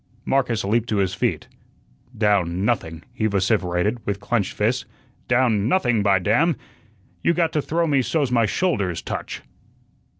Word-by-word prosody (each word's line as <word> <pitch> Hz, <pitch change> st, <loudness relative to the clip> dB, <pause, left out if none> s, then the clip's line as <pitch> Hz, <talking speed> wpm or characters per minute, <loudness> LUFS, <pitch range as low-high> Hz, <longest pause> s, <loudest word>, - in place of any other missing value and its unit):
Marcus 125 Hz, -5 st, +1 dB
leaped 115 Hz, +4 st, 0 dB
to 105 Hz, -, 0 dB
his 95 Hz, -2 st, +1 dB
feet. 95 Hz, -, -1 dB, 0.7 s
"Down 100 Hz, -4 st, +1 dB
nothing," 80 Hz, -8 st, -1 dB
he 110 Hz, -3 st, 0 dB
vociferated, 100 Hz, +1 st, 0 dB
with 100 Hz, -1 st, -3 dB
clenched 100 Hz, -1 st, -1 dB
fists. 115 Hz, +5 st, 0 dB, 0.4 s
"Down 120 Hz, -4 st, +2 dB
nothing, 120 Hz, -, +2 dB
by 100 Hz, -1 st, +4 dB
damn! 120 Hz, -, +2 dB, 0.7 s
You 170 Hz, -, +2 dB
got 165 Hz, -1 st, +1 dB
to 150 Hz, -, +1 dB
throw 165 Hz, +4 st, 0 dB
me 140 Hz, -4 st, +2 dB
so's 140 Hz, 0 st, 0 dB
my 115 Hz, -3 st, +3 dB
shoulders 100 Hz, -, -1 dB
touch." -, -, -5 dB
110 Hz, 145 wpm, -22 LUFS, 100-130 Hz, 0.7 s, by